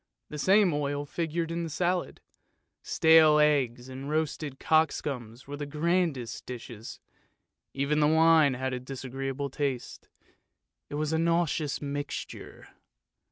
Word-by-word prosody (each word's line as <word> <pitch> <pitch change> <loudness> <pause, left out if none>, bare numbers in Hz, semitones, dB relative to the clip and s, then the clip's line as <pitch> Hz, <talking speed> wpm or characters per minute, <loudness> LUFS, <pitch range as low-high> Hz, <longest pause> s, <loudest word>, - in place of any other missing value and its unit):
The 150 - -5
same 195 0 +4
oil 145 0 -2
figured 165 +2 -3
in 170 +1 -2
the 165 - -4
salad; 175 +3 -1 0.6
stale 160 -1 +5
eggs 135 -5 +2
and 130 +2 -7
roasted 155 -2 -2
cockscombs 135 -7 0
were 145 +1 -7
the 145 0 -5
grandest 155 -4 -1
dishes, 120 -2 -8 0.8
even 140 +2 +1
the 150 - +4
wine 160 -3 +5
had 130 +1 -3
a 125 - -2
disagreeable 135 +1 -5
taste; 135 -3 -4 0.8
it - - -5
was 155 +1 -1
a 160 - +1
nauseous 165 -4 0
mixture. 145 0 -6
145 Hz, 125 wpm, -28 LUFS, 135-160 Hz, 0.8 s, stale